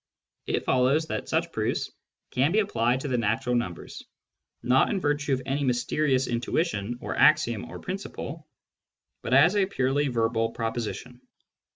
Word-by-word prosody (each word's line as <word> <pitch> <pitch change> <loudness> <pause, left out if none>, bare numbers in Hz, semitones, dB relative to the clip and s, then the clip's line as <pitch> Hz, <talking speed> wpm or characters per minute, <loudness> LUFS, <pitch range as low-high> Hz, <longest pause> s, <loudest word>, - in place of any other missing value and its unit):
It - - -1
follows 130 +5 +2
that - - -4
such 165 +1 0
proofs 110 -5 -2 0.4
can 135 +5 +2
be 205 - +1
applied 130 - +1
to 145 - -4
the 125 -3 0
natural 115 +3 0
numbers, 120 -8 -3 0.6
not 130 +2 +3
in 205 - 0
virtue 145 -3 -1
of 130 0 -1
any 140 +2 -1
mysterious 130 +1 +1
intuition 120 - -1
or - - -4
axiom 120 -8 +3
or - - -9
principle, 165 -5 -6 0.7
but 125 - +1
as 160 +8 +6
a 195 -2 +3
purely 140 -4 0
verbal 115 -2 0
proposition. 115 +2 -4
130 Hz, 150 wpm, -26 LUFS, 120-150 Hz, 0.7 s, as